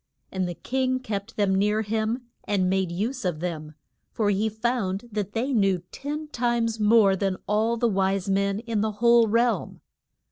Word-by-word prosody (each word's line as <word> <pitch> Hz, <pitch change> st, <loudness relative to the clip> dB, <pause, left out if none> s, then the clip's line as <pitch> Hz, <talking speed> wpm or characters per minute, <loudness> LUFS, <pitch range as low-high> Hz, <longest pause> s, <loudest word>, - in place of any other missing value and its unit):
And 185 Hz, -2 st, -1 dB
the 175 Hz, -, -5 dB
king 260 Hz, +4 st, -1 dB
kept 215 Hz, -3 st, -5 dB
them 200 Hz, -2 st, +2 dB
near 210 Hz, +3 st, +2 dB
him, 220 Hz, +3 st, -1 dB, 0.2 s
and 195 Hz, -3 st, +1 dB
made 190 Hz, -1 st, 0 dB
use 230 Hz, +9 st, -3 dB
of 175 Hz, -5 st, -1 dB
them, 155 Hz, -3 st, -5 dB, 0.4 s
for 210 Hz, -2 st, +1 dB
he 210 Hz, +3 st, +1 dB
found 220 Hz, -2 st, -2 dB
that 205 Hz, -1 st, -3 dB
they 255 Hz, +5 st, -1 dB
knew 195 Hz, -6 st, +2 dB
ten 300 Hz, +2 st, -5 dB
times 235 Hz, -3 st, 0 dB
more 210 Hz, -2 st, +5 dB
than 190 Hz, -1 st, -1 dB
all 220 Hz, +3 st, +1 dB
the 235 Hz, -, +2 dB
wise 195 Hz, -2 st, 0 dB
men 200 Hz, +1 st, +1 dB
in 230 Hz, -3 st, -2 dB
the 215 Hz, 0 st, -1 dB
whole 235 Hz, +2 st, +5 dB
realm. 235 Hz, +2 st, 0 dB
210 Hz, 175 wpm, -25 LUFS, 195-235 Hz, 0.4 s, more